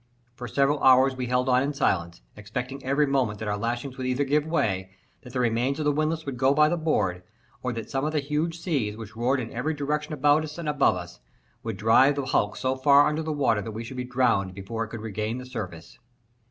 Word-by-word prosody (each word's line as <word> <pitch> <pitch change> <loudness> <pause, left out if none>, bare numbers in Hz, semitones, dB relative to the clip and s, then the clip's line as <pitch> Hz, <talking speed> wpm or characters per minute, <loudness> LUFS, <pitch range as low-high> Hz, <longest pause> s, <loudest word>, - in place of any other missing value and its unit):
For 125 0 -7
several 140 +2 +2
hours 130 +1 +5
we 130 -1 -3
held 125 +1 +1
on 125 0 +4
in 140 +2 -1
silence, 85 - -1
expecting 125 +6 -6
every 140 +3 +2
moment 130 -7 0
that 110 - -5
our 105 - 0
lashings 120 +5 -3
would 130 - -2
either 130 +2 +1
give 145 +2 +1
way, 95 - 0 0.3
that 125 - -12
the 125 - -2
remains 120 +3 +1
of 155 - -2
the 150 - +4
windlass 155 +2 -1
would 135 -3 -4
go 135 +2 +3
by 150 +1 +5
the 175 - +1
board, 100 - 0 0.4
or 125 - -2
that 115 -2 -6
some 135 0 -1
of 155 - 0
the 155 - +1
huge 150 +4 -2
seas, 135 - -1
which 110 -1 -9
roared 125 +4 +1
in 115 -3 -6
every 150 +7 -2
direction 150 +1 -2
around 145 +2 +3
us 150 0 -7
and 170 -3 -5
above 145 -9 +3
us, 90 0 -8 0.4
would 115 -4 -5
drive 115 +7 +5
the 140 -2 -2
hulk 105 -5 0
so 130 0 0
far 140 +2 +5
beneath 155 +1 -3
the 160 - -2
water 120 -8 +1
that 110 +1 -6
we 110 +2 -5
should 120 +3 -8
be 125 - -2
drowned 120 -7 +1
before 110 +4 -4
it - - -6
could 115 0 -7
regain 110 +1 -3
the 130 - -7
surface. 95 -10 -7
130 Hz, 240 wpm, -26 LUFS, 110-145 Hz, 0.4 s, hours